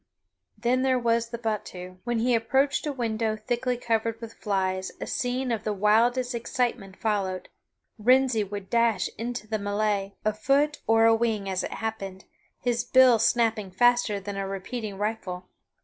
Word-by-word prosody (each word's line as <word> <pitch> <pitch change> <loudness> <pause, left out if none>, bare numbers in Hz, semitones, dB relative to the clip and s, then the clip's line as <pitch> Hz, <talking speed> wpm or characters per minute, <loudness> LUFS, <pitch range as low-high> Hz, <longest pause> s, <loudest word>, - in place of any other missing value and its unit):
Then 245 +4 +1
there 260 -1 +3
was 235 -1 +1
the 235 - -5
battue. 185 -5 -5
When 240 -1 0
he 240 +2 +2
approached 270 +6 +1
a - - 0
window 225 -4 -1
thickly 240 +3 -2
covered 230 -1 -1
with 230 -1 -8
flies 190 -2 -1
a - - -4
scene 250 0 -1
of 220 -2 -2
the 215 - -1
wildest 235 +5 +3
excitement 235 -4 -2
followed. 195 -4 -2 0.5
Wrensie 250 0 +4
would 200 -1 -6
dash 230 -5 +2
into 235 -1 -4
the 215 0 -2
melee, 205 -1 -1
afoot 275 +8 +1
or 225 0 +5
a 225 - +6
wing 225 -3 0
as 190 -1 -1
it - - -4
happened, 195 -4 -5 0.3
his 240 -1 0
bill 255 -3 +6
snapping 225 -2 +2
faster 240 +1 +3
than 200 0 -6
a 195 0 -2
repeating 195 +2 -5
rifle. 200 -4 -3
225 Hz, 160 wpm, -26 LUFS, 205-245 Hz, 0.5 s, a